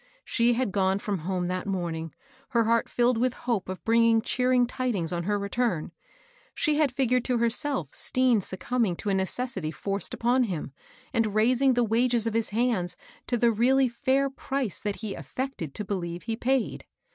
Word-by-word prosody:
She 235 0 +2
had 245 -3 0
gone 190 0 +2
from 200 -2 -3
home 180 +2 -2
that 185 +2 -3
morning, 170 -4 -3 0.3
her 235 -2 +3
heart 230 +1 +2
filled 240 -1 +2
with 255 +1 +1
hope 225 -7 -1
of 185 -3 -6
bringing 230 0 +4
cheering 250 0 +2
tidings 235 -9 -2
on 170 -1 -2
her 205 +1 +1
return. 200 -4 -1 0.6
She 300 -1 +1
had 300 -4 +3
figured 250 -1 +1
to 250 -2 +1
herself 235 - -1
Stean 255 -4 +2
succumbing 190 +2 -1
to 205 - -4
a - - +2
necessity 190 -2 -2
forced 195 +5 -3
upon 245 +2 +2
him, 170 -9 -4 0.4
and 220 -3 +1
raising 250 +4 +4
the 245 - +3
wages 235 +1 +2
of 225 - -1
bis 230 0 +1
hands 210 -6 0 0.3
to 245 - +1
the 235 0 +4
really 255 +3 +3
/air 270 +2 +1
^*(?e 270 -9 -3
that 205 0 -3
he 215 -3 -3
affected 255 - -5
to 210 - -4
believe 175 -3 -4
he 225 -1 -2
paid. 255 +1 -1
230 Hz, 180 wpm, -27 LUFS, 190-250 Hz, 0.6 s, bringing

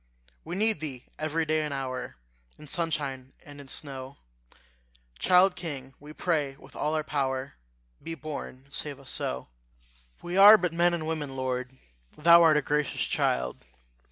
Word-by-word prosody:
We 170 +2 -5
need 215 -1 +2
thee 135 -5 -6
every 155 +1 -1
day 155 0 +1
and 150 -1 -3
hour, 130 - -4 0.4
In 150 - -13
sunshine 145 -5 -2
and 145 -1 -11
in 140 - -14
snow: 135 -1 -5 1.0
Child 185 +1 +5
king, 140 -7 -7
we 150 +1 -12
pray 150 -4 -1
with 135 0 -17
all 155 +1 -1
our 155 - 0
power 135 -2 -2 0.5
Be 165 - -6
born, 145 -4 -7
and 140 - -21
save 145 -2 -3
us 135 - -7
so. 65 0 -3 0.7
We 175 +2 -3
are 205 +2 +10
but 180 -4 -2
men 175 +1 +3
and 160 -2 -4
women, 150 -4 -3
Lord; 130 0 -3 0.4
Thou 170 +2 +7
art 160 -2 +6
a 150 - +1
gracious 150 0 0
child! 60 0 -1
150 Hz, 160 wpm, -28 LUFS, 135-165 Hz, 1.0 s, are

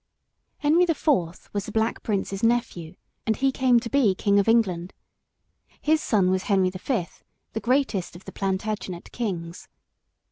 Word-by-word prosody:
] - - -50
HENRY 320 +5 +5
the 330 -2 +1
Fourth 185 - 0
was 205 +1 -3
the - - -5
Black 220 +1 0
Prince's 200 -2 -2
nephew, 230 -8 0 0.3
and 220 - +2
he 270 0 +2
came 255 -2 +3
to 230 - -6
be 230 -7 +3
king 200 +1 +2
of 200 - +1
England. 190 -6 +2 0.9
His 310 +1 +2
son 190 -4 +2
was 185 0 0
Henry 190 -2 +3
the 185 - -8
Fifth, 205 -6 -3 0.3
the 220 - -2
greatest 240 -8 0
of 175 - -13
the - - -8
Plantagenet 195 -2 -3
kings. 175 -7 -4
210 Hz, 170 wpm, -25 LUFS, 185-240 Hz, 0.9 s, HENRY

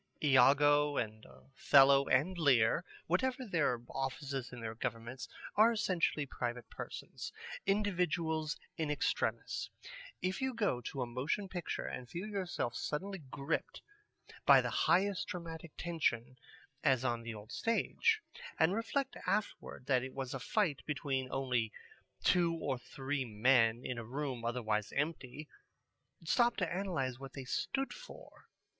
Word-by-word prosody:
Iago 145 +1 +5
and 110 -1 -2
Othello 135 0 +4
and 155 +9 +3
Lear, 130 -9 +4 0.2
whatever 255 - 0
their 150 - +1
offices 135 0 -3
in 125 - -8
their 115 -1 -4
governments, 115 +3 -4 0.3
are 220 +2 +7
essentially 185 -9 +1
private 120 -2 -4
persons, - - -7 0.4
individuals 170 -6 +1 0.2
in 160 -2 -1
extremis. 150 - -1 0.5
If 185 +4 -2
you 265 -2 -1
go 205 - +1
to 130 +2 -3
a - - -2
motion 130 +11 -2
picture 180 -3 -4
and 125 -1 -6
feel 175 +7 -4
yourself 185 - -2
suddenly 190 +10 -3
gripped 140 +1 -3 0.6
by - - +8
the - - -1
highest 190 +4 +2
dramatic 170 -4 -6
tension, 130 -8 -1 0.5
as 130 -4 +3
on 120 -2 0
the 115 -1 -6
old 105 +1 -10
stage, 440 - +1 0.4
and 175 - +4
reflect 265 +5 -1
afterward 205 -10 -2
that 130 -2 +3
it 130 +1 -7
was 135 -2 -3
a 135 - -3
fight 160 - 0
between 135 -3 -1
only 125 -5 0 0.5
two 170 -2 +4
or 140 -6 -2
three 135 +2 -3
men 115 +1 +3
in 125 -2 -3
a - - -5
room 130 0 -4
otherwise 110 -3 -1
empty, 150 -1 -3 0.8
stop 240 +8 +3
to 185 -4 -1
analyze 165 -10 -2
what 135 -1 -9
they 135 -2 -6
stood 270 - -1
for. - - -13
145 Hz, 140 wpm, -34 LUFS, 125-180 Hz, 0.8 s, by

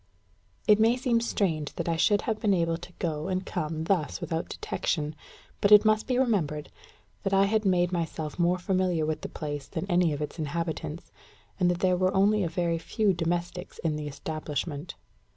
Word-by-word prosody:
It 210 0 +6
may 230 +3 +4
seem 245 -2 +1
strange 165 -10 -1
that - - -3
I 165 - +1
should 205 +5 +3
have 220 -3 -1
been 205 -3 +3
able 165 -1 +1
to 175 +1 -11
go 155 -3 -3
and 185 0 -1
come 155 +1 -3
thus 165 -3 0
without 165 0 -3
detection; 150 -2 -2 0.5
but 200 - +3
it 210 +1 +9
must 215 0 +3
be 255 -1 +1
remembered 180 - 0 0.5
that 195 0 0
I 195 0 +5
had 215 +1 +1
made 180 -2 +3
myself 165 -2 -3
more 175 +1 +3
familiar 180 -3 +1
with 155 0 -2
the - - -5
place 145 -3 -5
than - - -4
any 175 -2 +3
of 145 - -3
its 150 +2 -5
inhabitants, 160 +1 -4 0.5
and 180 -2 +4
that 175 0 -1
there 185 -1 +3
were 185 +1 +1
only 205 +2 +4
a 170 - -1
very 170 -1 0
few 210 +3 +1
domestics 175 +1 -3
in 160 -2 +1
the 150 0 -4
establishment. 150 +1 -4
175 Hz, 190 wpm, -28 LUFS, 155-195 Hz, 0.5 s, it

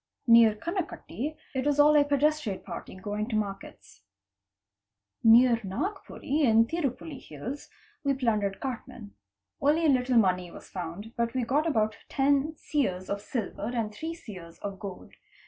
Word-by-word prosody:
Near 230 -2 +7
Kanakutti 310 - -4 0.2
it 265 +1 -1
was 290 0 +1
all 300 +1 +7
a 295 - +7
pedestrian 290 -6 +1
party - - -8
going 205 +3 -3
to 225 - -1
markets. 200 -2 -5 1.2
Near 235 +1 +7
Najpuri 290 - -3
in 225 -4 +5
Tirupulli 290 -1 -3
hills 240 - -7 0.3
we 280 -1 +2
plundered 215 -6 0
cartmen. 235 -4 -6 0.5
Only 300 +4 +3
a - - +5
little 255 -2 +3
money 185 -4 +3
was - - -12
found, 185 +5 -6
but 235 +1 -1
we 255 - +1
got 290 +7 +1
about 215 -7 +1
ten 285 +3 +2
seers 195 - -2
of 200 0 -2
silver 215 -2 -4
and 220 -3 -1
three 320 +8 -5
seers 180 - -11
of 200 -1 -5
gold. 195 -3 -8
235 Hz, 145 wpm, -28 LUFS, 205-290 Hz, 1.2 s, Near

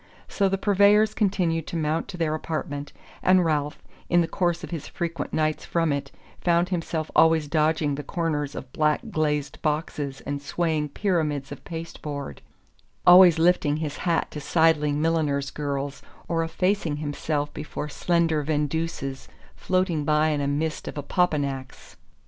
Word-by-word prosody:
So 195 -1 +1
the 195 - 0
purveyors 205 +2 +4
continued 175 -6 0
to - - -5
mount 155 0 -1
to 180 - -7
their 160 -2 0
apartment, 150 -2 -4 0.3
and 185 -1 +4
Ralph, 150 -1 -1 0.3
in 175 0 +4
the 165 - 0
course 175 0 -1
of - - -7
his 160 -3 -5
frequent 165 -3 -4
nights 155 -1 0
from 165 -3 0
it, 140 -1 -3 0.3
found 175 0 +2
himself 165 -3 -2
always 160 -2 +5
dodging 155 -1 +1
the 140 - -3
corners 150 -2 -2
of 125 - -8
black 150 -1 +2
glazed 150 -2 -1
boxes 150 -3 -2
and 140 0 -4
swaying 155 0 -1
pyramids 150 -7 -1
of 145 - -8
pasteboard; 155 -4 -6 0.6
always 175 -2 +8
lifting 160 -3 +3
his 150 -2 -4
hat 170 -2 0
to 150 - -6
sidling 150 -1 +2
milliners' 150 -4 0
girls, 140 -1 -3 0.3
or 165 -1 0
effacing 175 -1 0
himself 145 0 -2
before 150 0 -5
slender 165 0 +1
vendeuses 150 -2 -2 0.3
floating 185 -4 0
by 155 +1 +3
in 150 -2 0
a 140 - 0
mist 155 +3 -2
of - - -5
opopanax. 145 -4 -2
155 Hz, 150 wpm, -25 LUFS, 145-170 Hz, 0.6 s, always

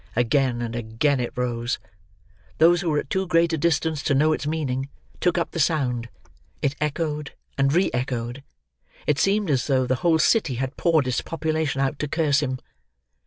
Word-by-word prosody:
Again 120 0 +1
and 115 0 -4
again 120 +5 0
it 120 - -2
rose. 120 -1 -1 0.8
Those 170 +3 +5
who 175 - -1
were 150 - +1
at - - -3
too 190 -1 0
great 170 -1 +3
a - - +1
distance 160 -1 +1
to 140 - +1
know 155 +3 +4
its 150 - -3
meaning, 140 -4 -2 0.3
took 180 0 +1
up 170 - -1
the 170 - -4
sound; 130 -7 0 0.5
it 140 0 0
echoed 150 -1 -2 0.2
and 135 0 +2
re 180 +5 +2
echoed; 125 0 -3 0.6
it 150 0 +1
seemed 200 -2 +2
as 130 -3 +1
though 130 -2 +2
the 130 0 0
whole 170 -2 +4
city 160 - +2
had 130 +2 -3
poured 160 -6 +2
its 125 - 0
population 155 -3 -1
out 135 +1 -1
to 150 - -1
curse 145 -2 +2
him. 130 -3 -2
145 Hz, 185 wpm, -24 LUFS, 130-160 Hz, 0.8 s, Those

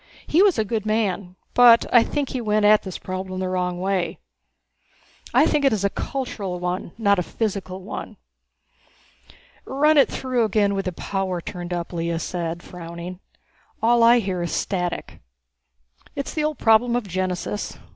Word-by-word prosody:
He 330 - +3
was 395 -7 +4
a 220 - +1
good 215 0 -2
man, 205 -4 -1 0.2
but 240 -2 +7
I 240 - +8
think 280 +3 -2
he 255 - -3
went 210 -1 +1
at 210 0 +6
this 190 -2 -6
problem 185 0 -5
the 185 - -1
wrong 180 -1 -1
way. 185 -2 -1 1.1
I 260 +5 +5
think 300 -2 +1
it 275 - +4
is 210 -3 -1
a 200 - +1
cultural 205 -9 -4
one, 180 0 -3
not 200 -4 +3
a - - +2
physical 190 -1 -4
one." 200 - -7 1.5
"Run 295 +3 +3
it 275 - +5
through 255 -3 -1
again 210 -1 +2
with 195 -1 -2
the 185 - -1
power 190 0 -3
turned 175 +1 -7
up," 175 0 -4
Lea 170 0 -1
said, 170 0 -4
frowning. 170 +1 -8 0.6
"All 235 +1 +3
I 235 +1 +7
hear 190 -5 -1
is 175 - -3
static." 180 -3 -3 0.9
"It's 280 - -4
the 305 -1 0
old 305 -1 -2
problem 230 +2 +4
of 245 -4 -2
genesis. 185 +2 -3
200 Hz, 165 wpm, -23 LUFS, 180-235 Hz, 1.5 s, I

